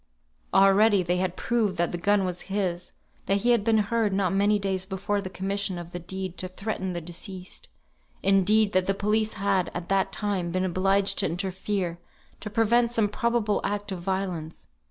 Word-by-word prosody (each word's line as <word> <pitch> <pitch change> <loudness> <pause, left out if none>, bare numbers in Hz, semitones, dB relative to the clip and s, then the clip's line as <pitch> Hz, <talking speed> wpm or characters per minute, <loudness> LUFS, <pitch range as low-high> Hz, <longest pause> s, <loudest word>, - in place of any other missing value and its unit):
Already 195 +1 +5
they 175 +1 0
had 185 -1 -1
proved 220 -6 0
that 170 0 +1
the 175 - -3
gun 200 +1 +2
was 180 +1 -5
his, 180 -3 -2 0.3
that 195 0 +2
he 245 - +3
had 235 -4 +3
been 225 0 +3
heard 215 0 +1
not 190 -1 +1
many 205 +2 +3
days 190 -2 -2
before 195 +1 -2
the 190 - -6
commission 195 0 -2
of 175 0 -8
the 175 - -5
deed 185 +1 -6
to 185 - -2
threaten 190 0 -4
the 175 - -3
deceased; 180 +2 -9 0.6
indeed, 200 +2 +4
that 185 0 +2
the 195 - +1
police 215 +2 0
had, 195 -2 +1
at 175 0 -5
that 195 0 +2
time, 200 -5 -2
been 185 +2 0
obliged 195 +2 +2
to - - +2
interfere 185 0 -3 0.4
to 210 - -6
prevent 230 +2 +2
some 225 -3 +1
probable 235 -2 0
act 205 0 -2
of 185 -2 -4
violence. 180 - -4
195 Hz, 185 wpm, -26 LUFS, 185-205 Hz, 0.6 s, Already